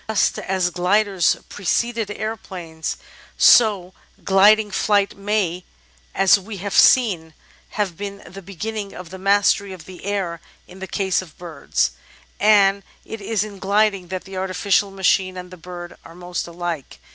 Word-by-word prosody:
Just 220 - +1
as 185 -2 -1
gliders 190 +1 +2
preceded 225 +3 -1
aeroplanes, 185 -7 -5 0.4
so 200 -6 +5 0.3
gliding 205 +2 +5
flight 200 0 +1
may, 195 -3 -1 0.5
as 195 +1 +5
we 200 +2 -8
have 200 +1 -5
seen, 175 -11 +4 0.4
have 195 -6 -1
been 200 -1 -7
the 190 +4 -10
beginning 200 +2 -6
of 180 -1 -10
the 190 - -8
mastery 200 0 +2
of 185 - -11
the 185 -1 -12
air 190 -5 -2 0.3
in 185 - -14
the 190 - -6
case 190 -1 0
of 170 -5 -14
birds; 165 -5 -2 0.5
and 200 -1 +4 0.2
it 225 -1 -8
is 205 0 -1
in 205 -2 -9
gliding 200 -1 +1
that 185 0 -5
the 190 -1 -9
artificial 190 +1 +1
machine 190 -1 +1
and 180 0 -8
the - - -9
bird 175 0 -9
are 165 - -14
most 175 0 -5
alike. 170 -4 -5
195 Hz, 150 wpm, -21 LUFS, 180-205 Hz, 0.5 s, so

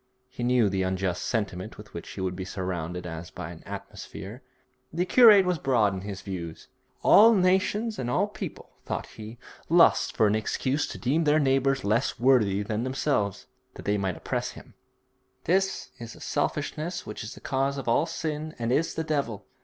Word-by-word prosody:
He 125 - -9
knew 120 -2 +3
the 95 -1 -1
unjust 95 -1 -1
sentiment 100 -5 -3
with - - -13
which - - -7
he - - -6
would 90 -1 -2
be 95 - -5
surrounded 90 -2 -4
as 80 0 -6
by - - -7
an - - -11
atmosphere. 110 +7 -8 0.5
The 175 +3 0
curate 210 -1 +7
was 180 -3 0
broad 115 -8 +2
in 95 - -5
his 100 0 -6
views. 85 -5 -7 0.3
'All 225 +2 +7
nations 195 +4 +1
and 120 - -2
all 185 +11 +2
people,' 210 - -8
thought - - -3
he, 110 +2 -10 0.3
'lust 170 +1 +4
for 110 - +5
an 105 - +3
excuse 130 +6 -1
to - - -7
deem 150 +6 +1
their 150 +1 +4
neighbour 135 -1 +2
less 110 +5 0
worthy 110 -6 +3
than 110 +2 -2
themselves, 130 -6 -1 0.3
that - - -10
they 105 0 +1
may 95 -3 -1
oppress - - -3
him. - - -14 0.7
This 190 +2 0
is 115 0 -8
the - - -14
selfishness 155 +4 -2
which 105 - -6
is 110 - -7
the - - -12
cause 135 +1 -1
of 135 - -6
all 140 +7 +3
sin 155 -1 -4
and 115 0 -2
is 160 +5 +1
the 160 - -1
devil.' 140 -10 -2
120 Hz, 185 wpm, -27 LUFS, 100-155 Hz, 0.7 s, curate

